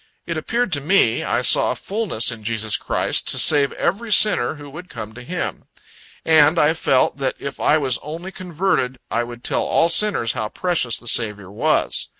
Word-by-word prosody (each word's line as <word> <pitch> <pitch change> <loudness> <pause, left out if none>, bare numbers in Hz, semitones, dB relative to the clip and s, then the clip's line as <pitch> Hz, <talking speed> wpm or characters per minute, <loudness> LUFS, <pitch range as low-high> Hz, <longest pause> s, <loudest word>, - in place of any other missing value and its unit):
It 165 - -4
appeared 230 +7 -2
to 145 -3 +1
me, 150 - +2
I - - -1
saw - - +4
a - - -1
fullness 195 - -1
in 115 -2 -10
Jesus 110 -1 0
Christ, - - 0
to - - +2
save 145 -3 +4
every 215 +6 -2
sinner 200 - +3
who 145 -1 -11
would 165 +6 -11
come 110 -2 -8
to 120 - -11
Him. 175 +8 -5 0.6
And 155 0 +5
I 155 0 +3
felt, 135 -5 +1
that 135 -2 -2
if 140 - -7
I 155 - +3
was 135 -5 -1
only 165 +5 -8
converted, 175 -8 -2
I 120 - 0
would 120 0 -10
tell - - 0
all 165 - +1
sinners 170 - +2
how 110 -4 -4
precious 170 -10 -1
the 120 - -10
Saviour 105 -4 0
was. 105 - 0
145 Hz, 190 wpm, -20 LUFS, 120-175 Hz, 0.6 s, And